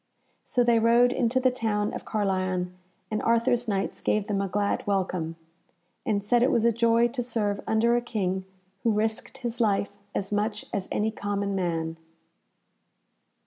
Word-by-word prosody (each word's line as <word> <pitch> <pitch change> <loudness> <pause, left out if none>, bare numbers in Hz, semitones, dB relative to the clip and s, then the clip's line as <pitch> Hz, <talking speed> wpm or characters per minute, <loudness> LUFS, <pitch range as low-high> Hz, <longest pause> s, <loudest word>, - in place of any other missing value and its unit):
So 245 - +1
they 235 -1 +4
rode 235 +2 +5
into 255 0 +1
the 255 0 +3
town 215 -3 -1
of - - -6
Carlion, 185 -3 -1 0.4
and 215 - 0
Arthur's 235 +1 +2
Knights 195 -2 -1
gave 210 -1 +1
them 200 -2 -1
a 200 - -1
glad 200 +2 -1
welcome, 185 -4 -1 0.7
and 205 -2 0
said 240 +3 +3
it 250 - +4
was 230 -3 +2
a 235 - +5
joy 230 +1 +3
to 245 +1 -3
serve 215 -4 -1
under 230 +2 +3
a 240 - +2
King 190 -6 -2 0.4
who 230 - +2
risked 220 +4 -2
his 240 -2 -3
life 200 -2 +2 0.2
as 195 0 -2
much 210 +1 -1
as 195 -1 -2
any 220 +1 +1
common 200 -1 -2
man. 165 -3 -1
215 Hz, 165 wpm, -27 LUFS, 200-235 Hz, 0.7 s, rode